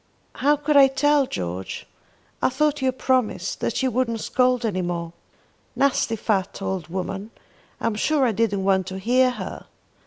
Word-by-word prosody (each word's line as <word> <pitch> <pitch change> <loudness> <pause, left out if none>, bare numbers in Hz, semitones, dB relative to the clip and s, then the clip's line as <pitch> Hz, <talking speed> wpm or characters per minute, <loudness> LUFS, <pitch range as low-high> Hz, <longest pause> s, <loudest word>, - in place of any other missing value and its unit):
"How 290 +2 +3
could 295 +1 -1
I 275 -1 +8
tell, 285 +1 +2
George? 90 - -5 0.6
I - - +3
thought 295 +2 0
you 265 - +1
had 260 0 -1
promised 255 -4 0
that - - -1
you 260 - +1
wouldn't 235 -1 0
scold 250 -1 +1
any 190 -4 -1
more. 170 -1 -3 0.6
Nasty 270 -4 +2
fat 200 -3 -1
old 190 -4 -3
woman! 195 +4 -4 0.5
I'm 230 - 0
sure 275 +6 +1
I 240 - +2
didn't 205 -2 0
want 190 -1 +2
to 190 0 -5
hear 250 +6 +3
her." 250 - -7
230 Hz, 165 wpm, -23 LUFS, 190-265 Hz, 0.6 s, I